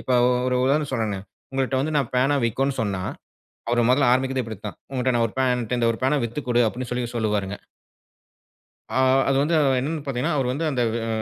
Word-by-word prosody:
இப்ப 130 - -2 0.3
ஒரு 125 0 +1
உதாரணம் 145 +2 +1
சொன்னேன்னே, 110 -5 -1 0.3
உங்கக்கிட்ட 135 0 0
வந்து 155 +3 -2
நான் 135 -5 0
பேனா 135 +3 +3
விக்கோன்னு 135 +4 0
சொன்னா, 100 -3 -2 0.7
அவர் 120 -1 +2
மொதல்ல 130 -1 +4
ஆரம்பிக்கிறது 130 0 +1
இப்படித்தான். 110 -2 -7
உங்கிட்ட 130 -1 +1
நான் 115 -1 +3
ஒரு - - -16
பேன் 130 -1 +3
என்கிட்ட 120 -1 0
ஒரு 115 - -8
பேனா 145 +3 +3
வித்து 120 +6 -5
குடு 120 0 +4
அப்படின்னு 125 +2 -6
சொல்லிச் 120 -1 -3
சொல்லுவாருங்க. 105 -3 -1 1.3
ஆ - - -3 0.3
அது 135 - +2
வந்து 160 +4 +1 0.3
என்னன்னு 150 +3 -3
பாத்தீங்கன்னா, 135 +5 -1
அவர் 130 -2 0
வந்து 150 +5 -2
அந்த, 125 -4 0 0.2
அ, - - -3
125 Hz, 185 wpm, -23 LUFS, 115-135 Hz, 1.3 s, மொதல்ல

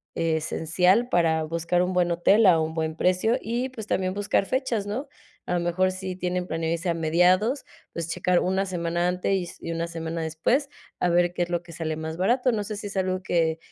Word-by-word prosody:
esencial 165 +7 +1
para 165 -4 +2
buscar 170 +2 0
un 185 +1 -1
buen 175 -1 +2
hotel 195 +6 +4
a 170 -3 +6
un 160 0 -1
buen 160 -1 -2
precio, 185 +8 +2
y 240 +4 -2
pues 220 -5 -8
también 185 0 0
buscar 205 0 +1
fechas, 250 -6 -1
¿no? 255 +8 -3 0.4
A - - -1
lo - - +1
mejor 185 +2 +1
sí 185 0 -5
tienen 180 0 -2
planeado 165 0 -1
irse 170 +2 -3
a 170 - +2
mediados, 180 - +2 0.3
pues 170 -1 -4
checar 180 -1 +2
una 190 +2 0
semana 175 -1 -1
antes 180 +2 -1
y 190 -2 +1
s - - -10
y 165 - -5
una 165 0 -2
semana 165 0 -4
después, 240 - 0 0.3
a 180 - +2
ver 175 0 +3
qué 180 - -3
es 175 - -5
lo 175 -1 -1
que 175 - -13
sale 160 -1 -3
más 160 0 -5
barato, 250 +7 +2
no 215 -3 -1
sé 215 +1 -5
si 205 - -7
es 200 - -7
algo 185 0 -1
que 165 -3 +1
180 Hz, 225 wpm, -25 LUFS, 165-195 Hz, 0.4 s, a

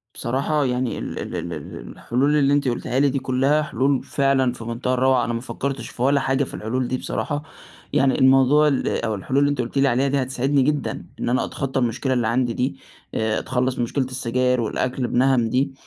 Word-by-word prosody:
بصراحة 140 +4 0
يعني، 125 -1 -1
ال - - -5
ال - - -5
ال - - -4
ال - - -8
الحلول 135 +5 0
اللي 140 -1 +3
أنتِ 145 -1 +1
قُلتيها 125 +1 -1
لي 140 0 +4
دي 135 +1 -1
كلّها 135 +4 +2
حلول 135 -2 0
فعلًا 135 -3 +1
في 120 - -9
مُنتهى 120 +2 -2
الروعة، 130 0 +3
أنا 120 - -2
ما 115 - -3
فكّرتش 130 -1 -4
في - - -10
ولا 140 +2 +3
حاجة 135 +1 +1
في - - -7
الحلول 125 +4 -2
دي 130 - -1
بصراحة، 145 +3 -3 0.5
يعني 135 -1 +3
الموضوع 135 +3 +5
ال 140 -3 0 0.2
أو 110 -2 -1
الحلول 130 +8 -1
اللي 145 0 +3
أنتِ 145 -3 0
قُلتِ 120 +3 -5
لي 140 0 +4
عليها 135 +2 +2
دي 140 0 +1
هتساعدني 135 +2 +1
جدًا 145 +2 -1
إن - - -1
أنا 130 +2 +1
أتخطّى 135 -1 -3
المشكلة 125 +2 0
اللي 120 -3 +1
عندي 120 +1 +1
دي 125 +3 -1 0.4
آآ، 110 0 0
أتخلّص 130 0 -1
من - - 0
مشكلة 130 +3 -1
السجاير 125 0 0
والأكل 125 +3 -1
بنهَم 125 -2 +2
دي 135 +3 0
130 Hz, 210 wpm, -22 LUFS, 125-140 Hz, 0.5 s, الموضوع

